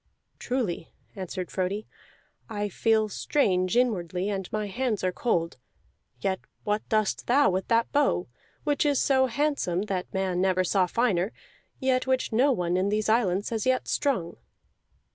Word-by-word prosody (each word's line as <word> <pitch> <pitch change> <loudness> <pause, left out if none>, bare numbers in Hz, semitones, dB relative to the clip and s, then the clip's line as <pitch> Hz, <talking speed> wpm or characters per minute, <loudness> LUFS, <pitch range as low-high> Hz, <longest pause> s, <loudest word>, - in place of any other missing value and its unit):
"Truly," 230 -10 -2 0.2
answered 185 -1 -5
Frodi, 195 +3 -2 0.6
"I 205 -2 -2
feel 220 +2 +2
strange 190 -3 +1
inwardly, 185 -6 0
and 195 -3 -3
my 215 0 -1
hands 220 0 -2
are 185 - +2
cold. 170 - -1 0.6
Yet 190 +7 -1 0.2
what 210 0 0
dost 215 -2 0
thou 275 -1 +4
with 190 +1 -2
that 230 0 +2
bow, 285 -11 +2 0.4
which 290 -2 +1
is 290 -3 +2
so 265 -1 +3
handsome 255 - 0
that 190 -3 -3
man 190 -2 0
never 185 -1 +2
saw 185 0 +2
finer, 200 -2 +1 0.5
yet 260 -1 +1
which 260 -1 +1
no 260 +6 +4
one 180 -6 0
in 190 +2 +1
these 215 +1 0
islands 205 -3 +2
has 225 +1 -1
yet 255 0 +1
strung?" 235 - 0
210 Hz, 150 wpm, -27 LUFS, 185-250 Hz, 0.6 s, thou